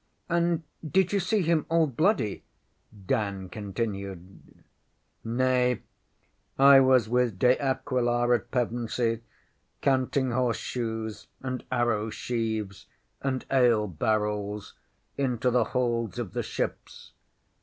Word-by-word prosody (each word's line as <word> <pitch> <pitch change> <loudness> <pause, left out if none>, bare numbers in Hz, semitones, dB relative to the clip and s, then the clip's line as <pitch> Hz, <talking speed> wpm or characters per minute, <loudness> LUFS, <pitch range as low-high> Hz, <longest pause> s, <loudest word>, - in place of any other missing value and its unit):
ŌĆÖ - - +2
ŌĆśAnd 170 -1 +2 0.3
did 190 0 +3
you 200 - +3
see 200 +2 +1
him 165 -2 +2
all 165 0 +4
bloody? 140 - 0 0.5
ŌĆÖ 100 -3 -17
Dan 100 -2 -1
continued. 100 -3 -6 0.6
ŌĆśNay, 125 0 +1 0.8
I 140 0 +8
was 130 -4 +4
with 120 -3 +1
De 125 +5 +5
Aquila 120 -3 +1
at 120 0 -1
Pevensey, 120 -1 -1 0.6
counting 130 -1 +1
horseshoes, 115 -3 -2
and 130 -1 -4
arrow 120 -3 +1
sheaves, 110 -4 -3 0.3
and 130 -1 -2
ale 120 -5 +4
barrels 105 +2 -2 0.5
into 125 -2 +1
the 120 -2 +3
holds 120 -3 -1
of 115 -7 -4
the - - -1
ships. - - -5
120 Hz, 110 wpm, -27 LUFS, 110-130 Hz, 0.8 s, I